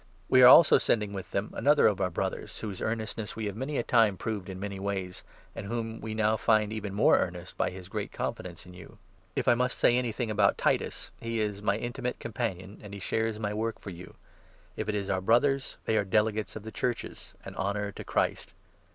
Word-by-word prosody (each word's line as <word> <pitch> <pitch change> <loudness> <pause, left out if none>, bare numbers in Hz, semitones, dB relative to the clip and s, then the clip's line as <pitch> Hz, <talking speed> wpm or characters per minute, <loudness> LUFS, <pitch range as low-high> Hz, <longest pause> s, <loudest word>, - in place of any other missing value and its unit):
We 130 - +6
are 125 - +11
also 150 +4 +9
sending 105 -3 0
with 95 -1 -6
them 100 +2 -3
another 150 +1 +4
of 100 -2 +3
our 90 - +2
Brothers, 85 - -4
whose 100 -4 -6
22 - - -4
earnestness 110 -1 -3
we 110 - -3
have 100 -1 -3
many 135 +5 -3
a - - +1
time 110 -6 +3
proved 105 -1 -4
in 95 -1 -6
many 100 -1 -5
ways, 95 -2 -4 0.3
and 100 - -6
whom 115 0 -4
we 110 -1 -5
now 110 0 +2
find 110 -1 +3
made - - -4
even 105 -2 -5
more 105 - +5
earnest - - -4
by - - 0
his 90 -1 -10
great - - -4
confidence 85 -1 -5
in 90 - -12
you. 95 +5 -13 0.4
If - - -1
I - - +7
must 125 +1 0
say 120 - +4
anything 120 -2 -1
about 100 -1 +3
Titus, - - -1
he 115 0 -2
is 105 -2 -2
23 - - -12
my 100 +1 +3
intimate 125 +2 -4
companion, 105 -4 -4
and 100 -1 -9
he - - -7
shares 110 +3 -1
my 105 -1 -2
work 110 +1 -2
for 100 - -8
you; 90 +1 -11 0.6
if - - -3
it 105 - 0
is 100 -2 -2
our 95 -1 0
Brothers, 130 +6 +2
they 110 - +2
are 105 - +3
delegates 105 +2 0
of 110 - -7
the 110 - -7
Churches, 120 0 -4
an - - -7
honour 100 +1 -2
to - - -8
Christ. - - -1
105 Hz, 230 wpm, -29 LUFS, 100-115 Hz, 0.6 s, are